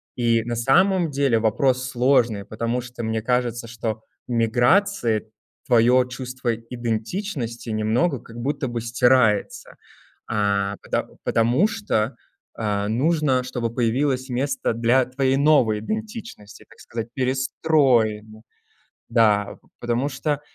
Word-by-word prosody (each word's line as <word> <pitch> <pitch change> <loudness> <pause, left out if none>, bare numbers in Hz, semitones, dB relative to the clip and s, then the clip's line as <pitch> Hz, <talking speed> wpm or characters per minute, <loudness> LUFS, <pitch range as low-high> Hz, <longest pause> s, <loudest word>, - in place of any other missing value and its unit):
И 115 -2 +2
на 120 0 -3
самом 175 - +3
деле 135 -5 +1
вопрос 130 +3 +1
сложный, 120 -5 +2
потому 115 +3 -2
что 125 -1 -8
мне 110 0 -1
кажется, 120 -1 -1
что 110 -1 -4 0.2
миграции 120 - +1 0.4
твоё 125 +1 +4
чувство 125 -2 -4
идентичности 120 - -4
немного 115 +7 0
как 115 0 -13
будто 135 +2 -2
бы 120 -1 -3
стирается, 120 -3 +1 0.5
а, 100 -2 0
пото - - -2 0.2
потому 120 - +2
что, 195 - -1 0.4
э, 105 -2 -1
нужно, 135 +2 +1
чтобы 115 -2 -4
появилось 130 +2 0
место 130 -1 -1
для 120 +3 +2
твоей 130 +1 0
новой 140 -8 +3
идентичности, 215 - -7
так - - -19
сказать, 115 0 -6
перестроим, 125 -5 +1 0.7
да. 105 -3 +2 0.2
Потому 120 +4 -1
что, 145 +2 -2
120 Hz, 115 wpm, -23 LUFS, 115-135 Hz, 0.7 s, твоё